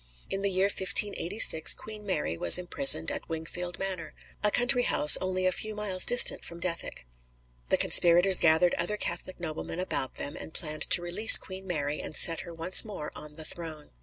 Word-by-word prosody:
In 195 - -4
the 200 - -2
year 190 0 -1
1586 200 -3 +2
Queen 215 -1 -11
Mary 185 - -5
was 85 +1 +5
imprisoned 270 +11 +1
at 285 -7 -8
Wingfield 170 +2 -7
Manor, 185 -4 -6 0.3
a 210 - +1
country 245 +3 +2
house 150 -10 +6
only 185 0 -4
a 185 - +1
few 215 +3 -4
miles 200 -3 0
distant 245 0 +5
from 170 - -11
Dethick. 170 - -6 0.6
The - - +1
conspirators 175 +2 +4
gathered 160 +2 +1
other 175 +5 -3
Catholic 185 -2 -6
noblemen 165 0 -8
about 160 -7 -5
them, 145 - -5
and 160 - -12
planned 155 -2 -2
to 175 - +2
release 180 +6 +7
Queen 190 0 -11
Mary 150 -4 -5
and - - -9
set 165 -1 0
her 175 - -10
once 165 +3 +1
more 195 -9 -10
on 150 -1 -10
the 160 0 -8
throne. 165 -4 -9
180 Hz, 185 wpm, -26 LUFS, 160-195 Hz, 0.6 s, release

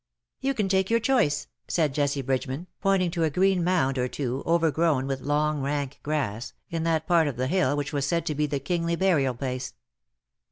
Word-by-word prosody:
'^ - - -61 0.2
" - - -57
You 275 +1 0
can 210 -4 0
take 190 0 +1
your 230 0 +3
choice,^^ 210 - +2 0.3
said 155 -5 +1
Jessie 140 -1 0
Bridge 130 +2 -1
man, 135 +7 -5 0.2
pointing 195 -3 +2
to 165 0 -1
a 160 - +3
green 185 +3 +2
mound 160 -7 +1
or 125 - +1
two, 130 0 -3
overgrown 165 -4 +2
with 135 -1 -3
long 150 +1 0
rank 140 0 -2
grass, 130 -7 -2 0.2
in 165 -1 -2
that 160 -1 +1
part 170 -4 +3
of 135 -5 -3
the 130 - 0
hill 145 -2 +1
which 145 0 -3
was 140 -1 0
said 170 +3 0
to 155 - -1
be 150 +1 0
the 145 -1 -2
kingly 170 +4 -1
burial 160 -9 +2
place. 125 0 -4
150 Hz, 215 wpm, -26 LUFS, 135-170 Hz, 0.3 s, your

